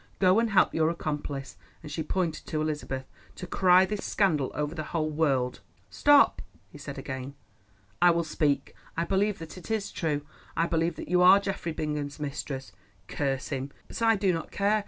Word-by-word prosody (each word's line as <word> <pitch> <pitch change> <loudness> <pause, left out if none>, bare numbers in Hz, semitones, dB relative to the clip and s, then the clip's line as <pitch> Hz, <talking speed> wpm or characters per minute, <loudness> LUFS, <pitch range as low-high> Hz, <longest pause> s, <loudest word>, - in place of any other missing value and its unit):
Go 185 +2 +4
and 230 0 +1
help 200 -3 +4
your 160 0 +2
accomplice," 145 -4 -4 0.3
and 150 - -8
she 160 - -3
pointed 165 0 -2
to 155 - -2
Elizabeth, 150 -4 -3 0.3
"to 185 - -7
cry 185 0 +5
this 210 +1 -4
scandal 155 -10 +1
over 150 +1 -2
the 165 - -4 0.2
whole 155 -1 0
world." 135 -5 +1 0.3
"Stop," 290 - +5 0.3
he 145 - -12
said 140 -1 -7
again. 130 0 -6 0.7
"I 175 - +7
will 170 0 +2
speak. 145 -3 0 0.2
I 170 - +1
believe 200 +3 +1
that 165 +2 -9
it 180 - -12
is 220 -2 -1
true. 150 -4 -2 0.3
I 165 - +3
believe 165 0 0
that - - -8
you 180 0 +3
are 185 +2 +8
Geoffrey 195 -4 -3
Bingham's 150 -2 -3
mistress, 140 -2 -5 0.4
curse 135 -2 -2
him! 135 0 -3 0.2
but - - -7
I 225 -1 +5
do 195 -2 +2
not 165 -1 -4
care. 205 +2 +2
160 Hz, 185 wpm, -28 LUFS, 145-185 Hz, 0.7 s, are